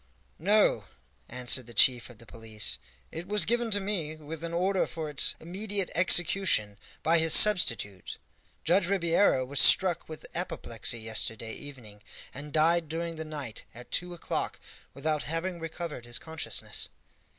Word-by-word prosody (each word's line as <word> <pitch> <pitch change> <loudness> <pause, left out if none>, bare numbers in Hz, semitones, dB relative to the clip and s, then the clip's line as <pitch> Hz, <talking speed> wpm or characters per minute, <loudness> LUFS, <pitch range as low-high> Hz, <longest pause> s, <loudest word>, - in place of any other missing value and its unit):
"No," 205 +6 +2 0.4
answered 125 0 -1
the 120 - -12
chief 125 -2 +4
of 120 - -14
the 115 - -15
police, 110 -1 -4 0.3
"it 170 +2 -7
was 210 +1 +3
given 240 +1 0
to 205 -1 +1
me, 190 -6 -3
with 155 +1 -9
an 170 - -4
order 185 +3 0
for 160 -2 -6
its 145 - +1
immediate 195 +3 -4
execution, 175 - +3 0.2
by 165 +1 +3
his 160 -1 +6
substitute. 115 - +4 0.5
Judge 180 +2 +2
Ribeiro 170 -7 +2
was 140 +2 -1
struck 185 -4 +5
with 155 - -8
apoplexy 130 - -2
yesterday 110 0 -3
evening, 120 -8 -12 0.3
and 145 +2 -9
died 160 +1 +2
during 165 +1 -4
the 160 - -5
night 145 -7 -7
at 120 +1 -13
two 180 0 -3
o'clock, 170 - -4 0.4
without 150 +2 -1
having 170 +3 -3
recovered 165 -5 -6
his 120 0 -3
consciousness." 160 +3 -4
160 Hz, 150 wpm, -28 LUFS, 125-175 Hz, 0.5 s, his